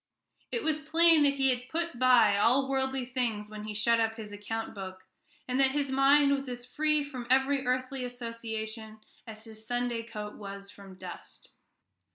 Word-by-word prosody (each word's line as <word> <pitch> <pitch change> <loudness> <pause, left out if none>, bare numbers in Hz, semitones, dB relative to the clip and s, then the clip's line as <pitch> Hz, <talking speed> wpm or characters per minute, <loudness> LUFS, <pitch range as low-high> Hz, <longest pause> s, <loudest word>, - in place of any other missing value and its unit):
It 465 - -1
was 310 -1 +1
plain 325 +1 +5
that 280 -1 +4
he 270 -1 +3
had 250 0 -4
put 335 -5 -3
by 250 -5 +6
all 250 +7 +3
worldly 265 -1 -1
thoughts 235 -5 -2
when 210 0 -7
he 215 -1 -5
shut 230 +2 +3
up 225 0 +1
his 215 -2 -8
account 220 +3 -5
book, 190 -2 -8 0.4
and 255 +1 -1
that 265 -1 +4
his 285 -2 -1
mind 280 +1 +5
was 275 -1 -1
as 245 0 -6
free 305 +3 +1
from 255 -4 -7
every 265 0 +2
earthly 255 +1 -1
association 230 -2 -6 0.3
as 220 -1 -9
his 220 -1 -9
Sunday 245 -1 -1
coat 210 -2 -7
was 200 -1 -8
from 195 -2 -13
dust. - - -11
245 Hz, 180 wpm, -29 LUFS, 220-270 Hz, 0.4 s, by